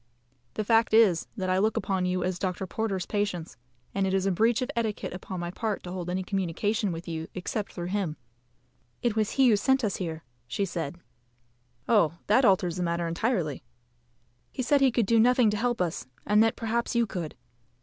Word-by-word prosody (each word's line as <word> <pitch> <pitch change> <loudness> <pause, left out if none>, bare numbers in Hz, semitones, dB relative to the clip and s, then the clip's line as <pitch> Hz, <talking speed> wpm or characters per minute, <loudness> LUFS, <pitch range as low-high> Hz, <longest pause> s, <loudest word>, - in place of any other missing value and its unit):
"The 215 - -1
fact 225 +1 +3
is, 200 -7 +5
that 185 -2 -1
I 185 - +2
look 215 +3 +1
upon 190 -2 0
you 180 0 0
as 180 -1 -2
Dr. 190 0 -2
Porter's 195 -1 -2
patients, 200 -6 -2 0.4
and 195 -1 +1
it 190 - +1
is 190 0 +1
a 195 - +2
breach 225 +6 +2
of 260 - -4
etiquette 220 -5 -2
upon 185 0 -6
my 175 0 -3
part 215 +2 -3
to 180 - -7
hold 180 -1 -4
any 185 +1 -1
communication 195 +2 -1
with 165 +1 -6
you 160 -1 -4
except 195 +3 -3
through 175 - -5
him." 185 -6 -2 0.9
"It 235 -3 +1
was 215 -1 0
he 270 -2 +5
who 220 - +5
sent 265 +6 +2
us 210 - 0
here," 160 -3 -4 0.3
said 170 -5 -2
she. - - -25 0.9
"Oh, 205 -9 +4
that 235 +6 +4
alters 185 -4 +3
the - - -2
matter 170 -1 -1
entirely." 170 - -1 0.9
"He 255 - -3
said 280 +3 +3
he 270 - +6
could 235 -2 +1
do 230 +3 +3
nothing 245 -1 +5
to 210 - -1
help 240 +1 0
us, 170 -7 -2 0.2
and 210 +1 +4
that 225 0 +3
perhaps 235 +1 -1
you 235 0 +3
could." 175 -7 -5
195 Hz, 200 wpm, -27 LUFS, 180-225 Hz, 0.9 s, he